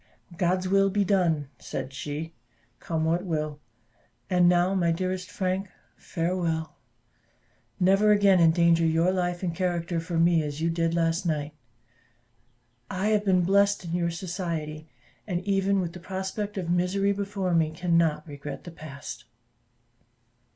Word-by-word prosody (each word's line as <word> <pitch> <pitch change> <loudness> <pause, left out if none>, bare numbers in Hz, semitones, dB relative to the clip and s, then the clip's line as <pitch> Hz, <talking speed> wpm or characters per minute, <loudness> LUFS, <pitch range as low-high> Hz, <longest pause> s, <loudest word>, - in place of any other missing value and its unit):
"God's 185 +1 0
will 195 +1 +3
be 205 +1 +1
done," 170 -8 +1
said 135 - -5
she, 150 +4 -5 0.5
"come 160 -1 -2
what 170 +2 +1
will. 155 -4 -3 0.7
And 180 -1 +5
now, 180 +2 +3
my 175 -3 +2
dearest 185 +2 -2
Frank, 190 -1 -2 0.3
farewell 165 -2 -2 1.0
never 195 +3 +4
again 200 -3 +5
endanger 170 0 +4
your 165 +2 +3
life 175 -1 -1
and 175 -2 -1
character 175 -1 -1
for 165 +1 -3
me 165 0 +4
as 145 -1 -4
you 165 +1 +1
did 165 0 0
last 165 0 +1
night. 150 -2 -2 1.4
I 190 +3 -1
have 210 -1 +2
been 185 -2 +3
blest 200 +1 +3
in 165 - -5
your 170 -1 +1
society, 165 -4 -4 0.4
and 180 -3 -1
even 195 0 +1
with 170 -2 -3
the 180 - -9
prospect 190 +3 -4
of 180 -3 -3
misery 180 +3 +1
before 200 -2 -2
me, 165 -2 +3
cannot 165 -1 +1
regret 145 -1 -7
the 175 - -9
past." 140 -7 -9
175 Hz, 145 wpm, -27 LUFS, 165-190 Hz, 1.4 s, And